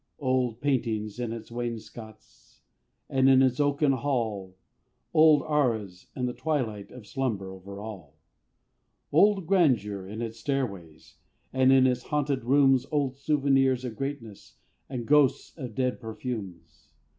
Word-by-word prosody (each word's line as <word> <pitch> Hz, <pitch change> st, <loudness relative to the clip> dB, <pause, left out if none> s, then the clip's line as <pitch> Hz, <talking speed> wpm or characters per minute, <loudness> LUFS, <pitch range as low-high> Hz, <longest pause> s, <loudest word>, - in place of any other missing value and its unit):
Old 130 Hz, -4 st, -1 dB
paintings 115 Hz, -6 st, -1 dB
on 120 Hz, -2 st, -3 dB
its 115 Hz, 0 st, -8 dB
wainscots, 110 Hz, -, -8 dB, 0.5 s
And, 135 Hz, 0 st, +3 dB
in 135 Hz, 0 st, +6 dB
its 130 Hz, 0 st, +1 dB
oaken 145 Hz, 0 st, +2 dB
hall, 115 Hz, -8 st, -2 dB, 0.6 s
Old 155 Hz, -2 st, +6 dB
arras; 110 Hz, -11 st, -1 dB
and 125 Hz, -1 st, -1 dB
the 125 Hz, -, -3 dB
twilight 125 Hz, -9 st, -2 dB
Of 125 Hz, -4 st, -12 dB
slumber 105 Hz, -4 st, -3 dB
over 100 Hz, +1 st, -10 dB
all. 95 Hz, -9 st, -9 dB, 0.9 s
Old 200 Hz, -3 st, +4 dB
grandeur 115 Hz, -, +1 dB
on 110 Hz, +3 st, -5 dB
its 115 Hz, 0 st, -6 dB
stairways; 100 Hz, -, -4 dB, 0.4 s
And, 130 Hz, 0 st, +4 dB
in 135 Hz, -1 st, +6 dB
its 125 Hz, -1 st, +1 dB
haunted 145 Hz, -2 st, -1 dB
rooms, 135 Hz, 0 st, +4 dB
Old 140 Hz, -4 st, 0 dB
souvenirs 135 Hz, -3 st, +1 dB
of 120 Hz, -3 st, -5 dB
greatness, 135 Hz, -6 st, -7 dB, 0.3 s
And 125 Hz, -3 st, -4 dB
ghosts 145 Hz, -1 st, +2 dB
of 125 Hz, -8 st, -7 dB
dead 130 Hz, -1 st, -1 dB
perfumes. 110 Hz, -8 st, -7 dB
125 Hz, 135 wpm, -27 LUFS, 110-135 Hz, 0.9 s, in